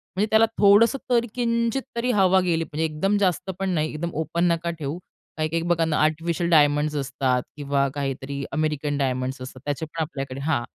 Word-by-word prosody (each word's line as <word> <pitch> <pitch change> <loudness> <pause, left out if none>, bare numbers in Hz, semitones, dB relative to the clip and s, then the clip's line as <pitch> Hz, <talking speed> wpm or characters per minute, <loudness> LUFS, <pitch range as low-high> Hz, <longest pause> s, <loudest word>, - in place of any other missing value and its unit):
म्हणजे 200 - +2
त्याला 220 +1 +5
थोडसं 210 +6 +6
तर 235 -1 +3
किंचित 235 +1 0
तरी 245 +2 0
हवा 190 -3 +4
गेली 170 -3 0
म्हणजे 160 0 -2
एकदम 195 +7 0
जास्त 190 -1 0
पण 195 - -1
नाही 155 -3 0
एकदम 170 +3 -3
ओपन 170 +3 -1
नका 170 0 -1
ठेऊ. 145 +2 -3 0.4
काही-काही 155 +1 -1
बघा 170 -1 +1
ना 155 -1 0
आर्टिफिशियल 165 +2 0
डायमंड्स 150 -1 +3
असतात 130 -2 0
किंवा 140 -1 0
काहीतरी 140 0 -3
अमेरिकन 150 -2 -1
डायमंड्स 130 -1 -2
असतात 130 0 -9
त्याचे 145 +2 -2
पण 160 +1 -5
आपल्याकडे 135 -4 -4
हां. 140 -5 0
155 Hz, 180 wpm, -24 LUFS, 140-185 Hz, 0.4 s, थोडसं